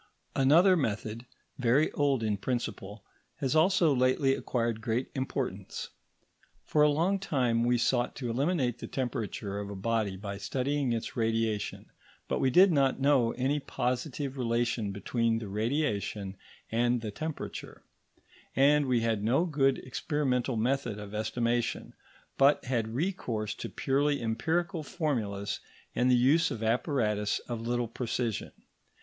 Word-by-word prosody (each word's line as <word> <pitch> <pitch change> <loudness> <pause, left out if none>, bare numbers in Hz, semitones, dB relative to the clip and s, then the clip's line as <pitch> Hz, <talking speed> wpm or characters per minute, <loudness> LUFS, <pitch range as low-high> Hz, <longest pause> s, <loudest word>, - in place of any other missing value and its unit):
Another 165 +8 +6
method, 115 - -2 0.3
very 130 +5 +3
old 140 -5 +1
in 105 -2 +1
principle, 105 -3 -4 0.3
has 135 0 -1
also 170 -1 +4
lately 130 +2 +3
acquired 115 -4 -1
great 115 +3 -1
importance. 130 -1 -4 0.8
For 150 - +2
a 150 - +6
long 170 +7 +1
time 125 -10 +1
we 120 0 +3
sought 120 +1 +1
to 125 -3 -3
estimate 135 -1 0
the - - -6
temperature 115 -6 -3
of 100 -1 -5
a 100 - -6
body 105 -1 -1
by 100 0 -6
studying 135 +3 -1
its 115 -1 -3
radiation, 115 -2 -1 0.4
but - - -1
we 130 - +3
did 185 +8 +6
not 135 -4 +2
know 135 -4 +3
any 135 +4 0
positive 135 +1 -3
relation 115 -3 0
between 115 +3 0
this 115 -2 -5
radiation 105 -3 -1 0.4
and 120 +1 +2
the 110 -2 -4
temperature, 155 +8 -6 0.7
and 145 +1 +4
we 125 -2 +2
had 110 -3 0
no 130 +10 +3
good 135 -5 +2
experimental 130 -2 -1
method 120 -1 0
of 105 -1 -8
estimation, 115 +2 -1 0.5
but 140 +1 +5
had 115 -3 -1
recourse 125 - -2
to - - -6
purely 140 +2 +1
empirical 160 +9 -1
formulas 120 - -2 0.3
and 125 - +2
the 125 - +6
use 140 +7 +4
of 115 - -5
apparatus 110 -3 +1
of 120 -2 -4
little 120 +1 -1
precision. 120 -1 -3
125 Hz, 140 wpm, -30 LUFS, 115-140 Hz, 0.8 s, Another